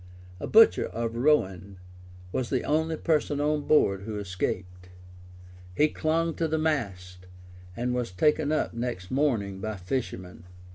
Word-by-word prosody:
A - - -4
butcher 225 +1 +6
of 115 0 -4
Rouen 100 - +1 0.5
was 125 +3 -2
the 130 - 0
only 160 +1 0
person 150 -3 0
on 150 0 0
board 100 -10 +3
who 105 +1 -5
escaped:[*] 90 -2 -4 0.9
he 150 +1 +4
clung 165 +2 0
to 165 - 0
the 160 0 0
mast, 95 - -2 0.5
and 125 +1 -1
was 125 -5 -2
taken 150 +9 +2
up 155 - 0
next 115 -6 -4
morning 115 -9 0
by 110 0 -3
fishermen. 95 -3 -5
120 Hz, 140 wpm, -27 LUFS, 95-150 Hz, 0.9 s, butcher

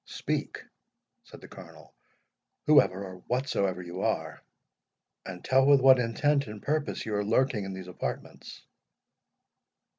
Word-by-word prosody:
"Speak," - - -4 0.6
said - - -14
the - - -12
Colonel, - - -14 0.7
"whoever 140 -10 +4
or 95 -1 -9
whatsoever 100 -8 -1
you 90 +2 -7
are, - - -2 0.9
and 90 -2 -8
tell 135 0 +4
with 140 -1 +6
what 130 -1 +6
intent 140 +4 +1
and 105 0 -8
purpose 150 +4 -2
you 110 - -4
are 105 0 0
lurking 115 -1 +1
in 95 - -6
these 95 -1 -8
apartments?" 90 - -7
110 Hz, 130 wpm, -28 LUFS, 95-135 Hz, 0.9 s, with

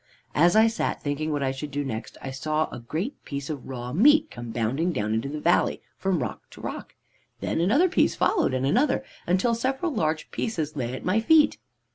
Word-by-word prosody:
"As 170 +5 +4
I 220 +1 +7
sat 225 0 -1
thinking 150 +2 -2
what 145 -2 -1
I 135 - +1
should 135 +3 -6
do 145 0 -3
next, 110 -4 -5
I 135 - -4
saw 155 +4 -1
a - - -6
great 160 - -4
piece 140 0 -5
of 145 -4 -6
raw 125 -2 -5
meat 295 - +5
come 120 -1 -7
bounding 125 +10 0
down 105 -7 -1
into 115 +5 -1
the 150 +1 -4
valley, 175 +3 +2 0.2
from 185 -7 0
rock - - -7
to - - -13
rock. - - -6 0.4
Then - - -1
another 275 - +4
piece 365 - +2
followed, 345 - +2
and 130 +1 0
another, 255 - +2 0.2
until 185 +7 +2
several 265 +7 -1
large 155 - -1
pieces 160 -9 -2
lay 125 -2 -2
at - - -8
my 185 +4 +3
feet. 300 +6 +4
155 Hz, 205 wpm, -26 LUFS, 135-225 Hz, 0.4 s, I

